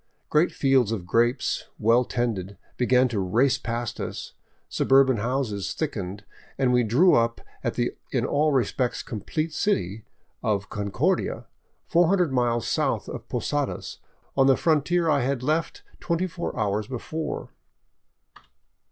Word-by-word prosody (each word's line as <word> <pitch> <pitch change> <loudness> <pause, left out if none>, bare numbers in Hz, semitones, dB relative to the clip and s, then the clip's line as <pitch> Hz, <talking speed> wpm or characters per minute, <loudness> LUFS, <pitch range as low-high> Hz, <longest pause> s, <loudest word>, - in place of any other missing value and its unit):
Great 155 +4 +3
fields 135 -5 +2
of 100 -6 -3
grapes, 120 +6 +1
well 115 +3 +4
tended, 105 -6 -2 0.2
began 125 +1 +3
to 115 -4 -2
race 125 +9 +2
by 115 - -4
us, 120 - -6 0.3
subur 135 +1 +4
ban 130 -3 +1
houses 105 -4 -2
thickened, 100 - -4 0.3
and 130 -2 +2
we 125 - +4
drew 135 - +4
up 115 0 +2 0.2
at - - -1
the - - -1
in - - 0
all 150 +2 +2
respects 130 -1 0
complete 155 +9 -3
city 110 - -1 0.4
of 100 -3 -1
Concordia, 100 -1 -1 0.4
four 175 0 +3
hundred 180 -6 +2
miles 120 -2 +1
south - - 0
of - - -8
Posadas - - -2 0.4
on 135 -1 +4
the 135 - +5
frontier 165 +2 +2
I 145 -3 +3
had 130 0 -1
left 165 - -1 0.2
twenty 170 +1 0
four 170 -7 -5
hours 105 0 0
before. 155 +5 -4
125 Hz, 140 wpm, -25 LUFS, 110-150 Hz, 0.4 s, the